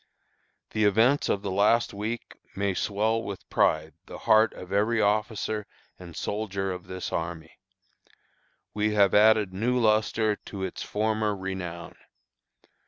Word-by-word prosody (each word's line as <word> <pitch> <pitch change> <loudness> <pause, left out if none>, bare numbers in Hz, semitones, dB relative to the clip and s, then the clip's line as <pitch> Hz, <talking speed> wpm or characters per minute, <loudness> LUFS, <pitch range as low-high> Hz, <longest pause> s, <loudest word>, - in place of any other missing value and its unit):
"The 110 - 0
events 115 +8 +3
of 100 - 0
the 100 - -3
last 105 +5 +2
week 110 +4 -5 0.2
may 100 0 0
swell 110 +4 0
with 100 -3 -7
pride 80 0 +2
the - - -8
heart 110 0 +4
of 90 +1 -9
every 110 +3 +2
officer 105 0 0 0.3
and 85 -3 -11
soldier 100 -2 -3
of 90 -1 -7
this 95 0 -5
army. 80 -1 -5 1.1
We 105 0 0
have 100 -2 +4
added 105 -2 +5
new 120 +6 0
lustre 110 -1 +2
to 100 -2 -8
its 95 - -5
former 110 0 -1
renown. 95 -3 -6
105 Hz, 135 wpm, -27 LUFS, 95-110 Hz, 1.1 s, added